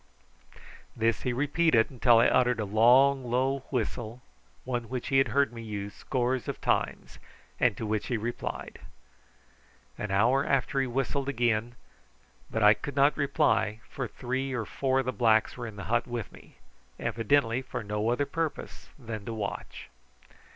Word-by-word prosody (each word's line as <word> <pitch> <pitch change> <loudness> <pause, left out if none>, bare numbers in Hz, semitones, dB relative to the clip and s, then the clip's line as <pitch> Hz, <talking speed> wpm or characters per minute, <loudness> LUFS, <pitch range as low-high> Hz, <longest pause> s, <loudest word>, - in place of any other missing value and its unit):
This 115 -3 +1
he 125 - -1
repeated 135 -2 +1
till 120 -2 +6
I 115 - +5
uttered 125 -2 +3
a 105 - -1
low 120 +7 +6
long 130 +1 -1
whistle, 120 -1 -3 0.4
one 120 -3 -3
which 130 +1 -4
he 135 -1 +4
had 135 - +3
heard 140 -3 +1
me 115 - -7
use 105 -2 -5
scores 125 -1 -2
of - - -4
times, - - -1 0.4
and - - +2
to 115 - -4
which 105 0 -2
he 120 - 0
replied. 120 +3 -5 1.2
An 105 - -3
hour 115 +8 +3
after 135 0 +1
he 135 - -1
whistled 135 +2 -1
again, 120 -2 0 0.7
but 110 - -1
I 105 0 +8
could 140 +4 -7
not 140 +1 +4
reply, 125 -7 +1
for 135 -3 -4
three 130 +3 -3
or 120 -3 -2
four 130 +4 -1
of - - -8
the 130 - 0
blacks 110 0 +3
were 120 -1 -6
in 110 - -9
the 100 - -7
hut 120 +1 0
with 120 -3 -5
me, - - -17 0.4
evidently 120 +1 +1
for 125 -3 -6
no 105 +2 -1
other 125 +4 +1
purpose 160 +2 -4
than 115 -6 -7
to 115 - -4
watch. 100 -2 -6
120 Hz, 165 wpm, -28 LUFS, 110-135 Hz, 1.2 s, I